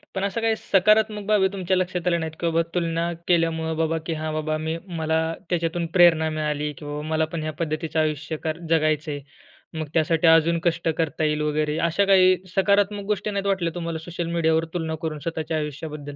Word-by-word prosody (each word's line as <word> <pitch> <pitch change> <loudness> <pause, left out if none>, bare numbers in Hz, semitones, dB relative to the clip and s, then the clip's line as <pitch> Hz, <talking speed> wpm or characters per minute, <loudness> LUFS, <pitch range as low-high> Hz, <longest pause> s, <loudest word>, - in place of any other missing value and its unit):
पण 190 - -1
अशा 200 +3 -1
काही 225 -1 +2
सकारात्मक 210 +2 +2
बाबी 205 -3 +4
तुमच्या 185 -1 0
लक्षात 180 -1 -2
आल्या 170 -1 +2
नाहीत 160 -1 -3
का? 170 - 0
की - - +1
बाबा 165 - +3
तुलना 170 0 0 0.2
केल्यामुळं 165 -2 +1
बाबा, 165 0 +1
की 165 - -2
"हां 155 0 -3
बाबा 155 0 -1
मी 160 +1 -3 0.2
मला 160 0 +1 0.3
त्याच्यातून 170 -1 -1
प्रेरणा 165 -2 +6
मिळाली, 150 -1 -2
की 145 - -12
बाबा 145 0 -4
मला 160 0 +1
पण 160 -2 -3
ह्या 155 0 -3
पद्धतीचं 160 0 -2
आयुष्य 155 0 -1
कर 160 0 -2
जगायचंय. 155 -2 +1 0.5
मग 155 -1 -4
त्यासाठी 165 +1 +2
अजून 165 +1 +5
कष्ट 170 -1 0
करता 160 -1 -1
येईल 150 0 +1
वगैरे." 150 0 0
अशा 200 +5 +2
काही 185 -1 +6 0.2
सकारात्मक 200 +1 +2
गोष्टी 210 +1 -4
नाहीत 200 0 -2
वाटल्या 180 -4 0
तुम्हाला 170 -2 -3
सोशल 170 +1 -5
मीडियावर 160 -1 +2
तुलना 160 -2 -2
करून 155 -2 -3
स्वतःच्या 160 0 -3
आयुष्याबद्दल? 150 -1 -5
165 Hz, 195 wpm, -24 LUFS, 155-175 Hz, 0.5 s, प्रेरणा